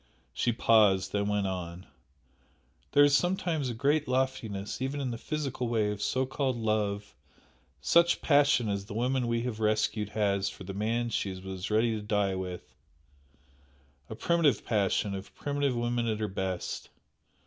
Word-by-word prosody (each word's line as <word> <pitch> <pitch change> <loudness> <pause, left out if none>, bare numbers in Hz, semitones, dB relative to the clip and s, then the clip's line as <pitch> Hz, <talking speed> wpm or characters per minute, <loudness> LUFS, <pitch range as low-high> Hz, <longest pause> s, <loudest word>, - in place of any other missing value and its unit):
She 120 - +1
paused, 105 -5 +4
then 100 0 0
went 105 -1 0
on 90 -1 -4 1.1
"There 145 - +7
is 145 0 +5
sometimes 170 -5 0
a 120 - -4
great 145 +5 +1
loftiness 125 -6 -2
even 135 +2 -2
in 130 -3 -2
the 115 - -4
physical 140 -5 -3
way 110 -3 +1
of 105 -1 -5
so 130 +5 +1
called 130 -1 -1
'love' 105 -2 -1 0.7
such 170 0 +4
passion 140 -5 +3
as 100 -1 -2
the 100 - -8
woman 125 +1 0
we 115 0 0
have 120 -3 -4
rescued 105 -1 +1
has 100 -2 +1
for - - -10
the 95 +1 -6
man 115 +4 -1
she 95 -3 -2
was 95 0 -6
ready 110 +2 +2
to 105 - -4
die 105 -2 0
with, 90 -1 -6 1.4
a - - -5
primitive 170 0 +2
passion 100 -1 +1
of 95 +1 -7
primitive 140 -2 -1
woman 120 0 0
at 110 -1 0
her 105 - -1
best. 95 -2 -4
110 Hz, 160 wpm, -29 LUFS, 100-130 Hz, 1.4 s, There